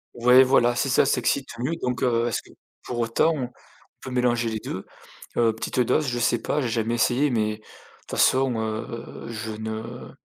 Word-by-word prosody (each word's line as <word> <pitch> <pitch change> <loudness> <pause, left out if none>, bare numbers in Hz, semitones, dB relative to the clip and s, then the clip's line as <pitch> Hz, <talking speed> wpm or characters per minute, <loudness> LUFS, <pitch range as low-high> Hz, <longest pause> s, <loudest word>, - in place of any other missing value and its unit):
Ouais, 125 +2 +7
voilà, 120 -2 +3
si 135 - 0
ça 135 - +4
s'excite 140 0 0
mieux, 135 +7 -1
donc 125 0 -2
heu, 120 -1 +2
est-ce 115 - -1
que - - -20 0.3
pour 120 - -5
autant 115 +8 +2
on 130 -4 -3 0.5
peut 130 - -7
mélanger 120 -2 +1
les 110 -1 -3
2? - - -6 0.5
Heu, 115 -2 +3
petite, 110 - -5
heu, 125 - +4
dose, 150 +4 +1
je 120 -1 -1
sais 120 0 +2
pas, 150 - -1
j'ai 125 - -1
jamais 115 +1 0
essayé 130 +5 +2
mais 110 -3 0
de - - -23 0.5
toute - - -11
façon, 130 -1 +3
heu, 110 +1 -5
je 110 -1 -5
ne 110 +2 -6
120 Hz, 200 wpm, -24 LUFS, 115-125 Hz, 0.5 s, Ouais